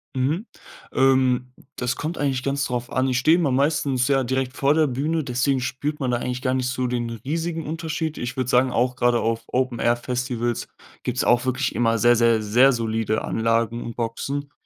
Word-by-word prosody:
Mhm. 150 - 0 0.5
Ähm, 130 -1 +2 0.2
das 125 0 -1
kommt 155 +6 -4
eigentlich 135 -3 0
ganz 140 +1 -1
drauf 125 -2 -3
an. 130 0 +1
Ich 130 -1 +1
stehe 155 +7 +4
meistens, 140 -3 +1
ja, 135 -2 +2
direkt 130 +1 -2
vor 140 +1 +3
der 155 -1 +3
Bühne, 150 +6 -1
deswegen 130 0 0
spürt 140 +4 -3
man 130 -2 0
da 120 - +1
eigentlich 125 +1 -4
gar 130 -1 +1
nicht 130 -1 0
so 130 0 -1
den 120 -1 -2
riesigen 160 +7 -3
Unterschied. 160 0 -3
Ich 120 +2 -4
würde 130 -1 -1
sagen, 125 +1 +3
auch 125 +1 +1
grade 120 -1 +2
auf 115 0 -1
Open 130 -1 -1
Air 120 +1 +3
Festivals, 120 -1 -2 0.4
gibt's 125 0 -1
auch 120 +1 +3
wirklich 130 +1 -1
immer 115 -1 +2
sehr, 120 +2 +5
sehr, 115 -1 +3
sehr 120 +6 +5
solide 110 -2 -1
Anlagen 115 +1 0
und 115 - -6
Boxen. 140 +5 -3
125 Hz, 190 wpm, -23 LUFS, 120-140 Hz, 0.5 s, sehr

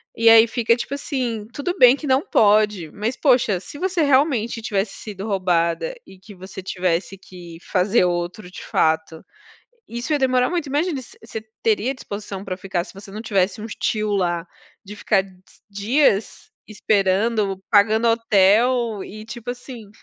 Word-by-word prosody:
E 230 0 +5
aí 225 0 +8
fica 230 0 +2
tipo 245 +3 -5
assim, 245 -7 -3
tudo 350 +8 -3
bem 250 -1 +7
que 300 - -8
não 265 +2 +3
pode, 210 - +2
mas 220 +5 -3
poxa, 245 - +3
se 285 +11 -11
você, 365 -3 0
realmente 260 -5 +2
tivesse 200 -2 -2
sido 200 -2 -8
roubada 185 - 0
e 190 - -16
que 205 +1 -14
você 190 +1 -9
tivesse 185 +1 -2
que 175 -3 -12
fazer 190 +1 +2
outro, 175 +3 -3
de - - -10
fato, 160 0 0 0.7
isso 240 +6 -4
ia 295 - +2
demorar 255 0 +2
muito. 340 -4 -2
Imagina 290 +1 -1
você 240 - -15
você 225 -1 -6 0.2
teria 225 +4 +1
disposição 200 -4 -7
pra 185 -1 -4
ficar 185 -2 -3
se - - -14
você 195 0 -12
não 215 +3 -7
tivesse 200 -2 0
um - - -5
tio 215 -1 0
lá, 175 -3 0 0.4
de 205 +2 -9
ficar 195 -2 +2
d 195 -1 -16 0.4
dias 225 - 0 0.2
esperando, 200 -1 0
pagando 220 +2 +4
hotel 230 +1 +2
e, 215 +1 -10
tipo 235 +2 -7
assim 245 -4 -11
215 Hz, 165 wpm, -21 LUFS, 190-245 Hz, 0.7 s, aí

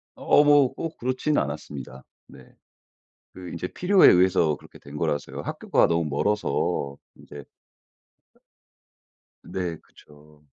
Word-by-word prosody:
어 145 - +3
뭐 145 -3 +4
꼭 165 -1 -6
그렇진 130 +4 -1
않았습니다. 70 -2 -5 0.2
네. - - -17 0.8
그 90 -1 -9
인제 85 +2 -5
필요에 190 +1 +5
의해서 90 -4 +3
그렇게 - - -17
된 70 +1 -13
거라서요. 75 - -3
학교가 - - 0
너무 85 -1 0
멀어서 70 -4 -1 0.2
인제 70 -1 -12 2.0
네. 90 -4 -5
그쵸. 75 0 -21
85 Hz, 240 characters per minute, -24 LUFS, -, 2.0 s, 필요에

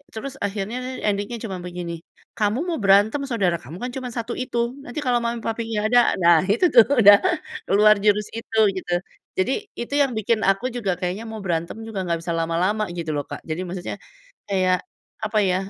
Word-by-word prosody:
terus 260 +5 -5
akhirnya 205 +4 -3 0.2
ending-nya 205 +3 -1
cuman 190 -5 -4
begini, 175 -2 -5 0.4
"Kamu 210 +4 +1
mau 345 -4 -2
berantem, 205 +6 +4
saudara 190 - 0
kamu 155 +8 -10
kan 245 - -3
cuma 255 0 -5
satu 235 0 -3
itu, 245 - -5 0.2
nanti 275 +1 -6
kalo 245 -2 +2
mami 235 0 -3
papi 225 0 -3
nggak 210 0 0
ada?" 245 - +7 0.2
Nah 170 -1 +7
itu 235 - +3
tuh 230 -3 +7 0.2
udah 205 0 +10 0.5
keluar 215 +2 +6
jurus 210 0 +3
itu 225 0 -6 0.2
gitu. 180 - -6 0.4
Jadi 190 +7 +1 0.2
itu 240 +4 -5
yang 275 -2 +2
bikin 220 +1 +1
aku 195 +7 +1
juga 200 -7 -1
kayaknya 190 +5 -3
mau 220 -2 -7
berantem 170 -2 -2
juga 210 -3 -4
nggak 170 -1 0
bisa 170 - -3
lama-lama 175 +6 0
gitu 165 -2 -3
loh, 145 -1 -3
Kak. - - -8
Jadi 155 +3 -2
maksudnya 180 0 -5 0.6
kayak 185 -2 +2 0.4
apa 215 0 0
ya, 180 - +2
210 Hz, 185 wpm, -23 LUFS, 180-235 Hz, 0.6 s, udah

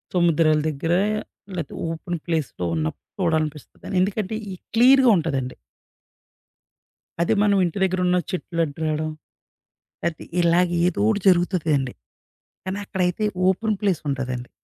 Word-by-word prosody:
సముద్రాల 165 -3 +4
దగ్గర 155 +3 -1 0.6
లేతే, 155 - -4 0.2
ఓపెన్ 165 +1 -4
ప్లేస్‌లో 155 - -2
ఉన్నప్పుడు 80 -1 -3 0.2
చూడాలనిపిస్తది. 155 -4 -2 0.2
ఎందుకంటే, 205 +2 -1 0.2
ఈ - - -6 0.2
క్లియర్‌గా 255 +2 +6
ఉంటదండి. 135 -6 -2 1.6
అదే 170 - +2
మనం 200 -1 +3
ఇంటి 175 +3 -3
దగ్గరున్న 180 -1 +2
చెట్లు 170 -2 -2
అడ్డు 145 +1 -9
రాడం. 155 0 -1 0.9
లెతే 170 -2 -2 0.2
ఇలాగ 175 +1 +3 0.2
ఏదోకటి 145 - +1
జరుగుతుందండి. 165 -7 +1 0.7
కానీ 190 +2 -3
అక్కడైతే 185 +1 0 0.2
ఓపెన్ 210 +3 +1
ప్లేసుంటదండి. 135 -9 -2
170 Hz, 105 wpm, -23 LUFS, 150-185 Hz, 1.6 s, క్లియర్‌గా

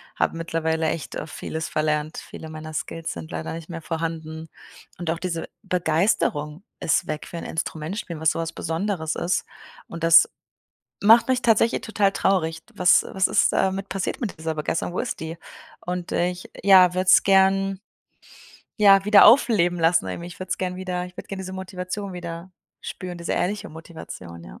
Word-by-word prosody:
habe - - 0
mittlerweile 160 -1 -1
echt, 165 - -4
äh, - - -5
vieles 160 +1 -5
verlernt. 155 0 -1
Viele 160 - -9
meiner 155 0 -8
Skills 165 +1 -4
sind 80 -2 -8
leider 80 - -4
nicht 165 0 -8
mehr 165 -1 -6
vorhanden. 160 -1 -4 0.5
Und 170 -2 -1
auch 165 - -3
diese 170 -3 -3 0.2
Begeisterung 160 -2 0 0.2
ist - - +1
weg 155 0 -4
für 170 - -7
ein - - -6
Instrument 160 +2 -4
spielen, 170 -7 -6
was 160 - +4
sowas 165 0 -3
Besonderes 165 -1 -2
ist. 175 +1 -1 0.4
Und 170 0 -8
das 165 0 +7 0.7
macht 225 +4 +6
mich 255 -1 +1
tatsächlich 230 0 +3
total 210 -3 +1
traurig. 165 -6 0
Was 180 -1 +4
was 190 -1 +2
ist - - +3
damit 195 +1 0
passiert 195 -1 -3
mit 230 -6 -4
dieser 160 0 -3
Begeisterung? 160 +3 -2
Wo - - -3
ist - - -4
die? 160 +1 -6 0.5
Und 180 -1 -3
ich, 180 +1 -2
ja, 185 -3 +7
würde 185 0 -1
es - - +7
gern, 195 0 +3 1.0
ja, 195 -2 +6
wieder 210 0 +8
aufleben 210 -8 +5
lassen. 165 - +3 0.2
Ich 175 -1 -10
würde 185 0 -7
es - - -1
gerne 180 -1 -2
wieder 180 -1 -3
ich 180 +1 -15
würde - - -9
gerne 195 -1 -5
diese 185 0 -7
Motivation 190 +1 -5
wieder 170 0 -7 0.3
spüren, 180 -2 -7
diese 170 - -3
ehrliche 200 +3 -2
Motivation, 155 - -10
ja. - - -12
175 Hz, 175 wpm, -24 LUFS, 160-190 Hz, 1.0 s, wieder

